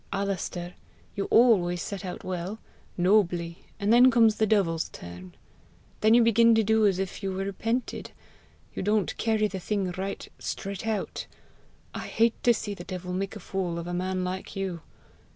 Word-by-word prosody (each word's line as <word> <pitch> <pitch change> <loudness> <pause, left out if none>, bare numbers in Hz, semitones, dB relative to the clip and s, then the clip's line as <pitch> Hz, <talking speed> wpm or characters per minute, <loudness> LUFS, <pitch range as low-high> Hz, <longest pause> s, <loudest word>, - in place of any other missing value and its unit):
Alister, 190 -3 -3 0.4
you 200 - -1
always 195 -7 +4
set 200 +2 -5
out 180 -2 -6
well 185 +3 -4 0.4
nobly 175 -3 +2 0.2
and 205 +2 +2
then 250 +2 +8
comes 230 -3 +4
the 220 - +2
devil's 175 -6 +1
turn! 90 +1 -10 0.6
Then 220 +2 +5
you 240 - +6
begin 230 0 +5
to 225 - +3
do 220 0 +4
as 190 -3 +1
if 190 +1 -4
you 195 -1 -2
repented! 200 +6 -3 0.6
You - - -4
don't 210 -1 +1
carry 220 -2 +1
the 195 -2 -5
thing 195 -1 -1
right 190 +2 -5
straight 195 +2 -5
out. 215 -3 -3 0.7
I - - -5
hate 230 0 +1
to 240 - +5
see 215 -2 -2
the 175 - -8
devil 180 0 -6
make 195 +1 -3
a - - -7
fool 180 -3 -3
of 170 - -5
a 175 - -4
man 185 +1 -1
like 185 +1 -5
you! 190 -4 -3
195 Hz, 170 wpm, -27 LUFS, 180-220 Hz, 0.7 s, then